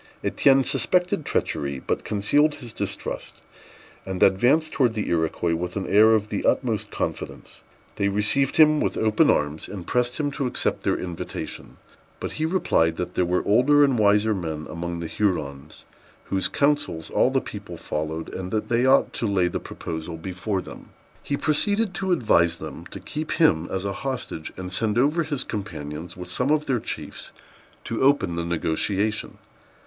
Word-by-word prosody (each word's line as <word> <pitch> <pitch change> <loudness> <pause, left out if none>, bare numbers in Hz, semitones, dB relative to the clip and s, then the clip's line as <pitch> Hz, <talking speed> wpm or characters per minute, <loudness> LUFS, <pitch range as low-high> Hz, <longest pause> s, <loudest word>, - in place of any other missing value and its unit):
Étienne 135 -1 +4
suspected 180 -4 +1
treachery, 70 - -1
but 65 - -2
concealed 145 +9 +2
his 120 -6 -9
distrust, - - -4 0.7
and 95 -1 -1
advanced 130 +12 +3
towards 120 -5 +2
the 105 - -2
Iroquois 85 0 0
with 90 +2 -3
an 100 -2 -2
air 110 +2 +6
of 105 -1 -1
the 100 - -2
utmost 115 -6 +1
confidence. - - -5 0.3
They 100 - +1
received 105 +7 +1
him 155 -1 +6
with - - -1
open 110 +8 +3
arms, 75 +1 0
and 95 -4 -7
pressed 125 - 0
him 145 -1 0
to 135 -1 -2
accept 125 - -1
their - - +1
invitation; 90 -2 -6 0.4
but - - -4
he 155 +1 -1
replied, 80 - +2
that 90 0 -4
there 90 - +1
were 90 +1 0
older 135 +7 +5
and 135 -5 +3
wiser 105 +1 +4
men 80 -5 -4
among 85 0 -4
the - - -4
Hurons, 80 -6 -3 0.4
whose 95 -2 0
counsels 145 - 0
all - - +3
the - - +2
people - - -8
followed, 80 +1 -4
and 95 -1 -5
that 110 +2 -2
they 120 +2 +2
ought 135 +1 +4
to 115 - -1
lay 95 -3 +2
the - - -3
proposal 80 +1 -6
before 95 +3 -3
them. - - -11 0.3
He 140 - -2
proceeded 200 +8 +1
to 190 0 -2
advise 95 - +3
them - - -8
to - - -9
keep 155 +1 -4
him 85 - +3
as 95 +1 -3
a 100 - -1
hostage, 130 - -4
and 95 0 -6
send 105 +2 0
over 145 +7 +3
his 145 -4 -2
companions, 80 -6 -6
with 90 -1 -7
some 125 +9 -1
of 150 0 +2
their 125 -3 +1
chiefs, - - -5 0.5
to 115 - -3
open 130 -11 +3
the 85 - -2
negotiation. 95 +6 -1
105 Hz, 175 wpm, -24 LUFS, 85-135 Hz, 0.7 s, air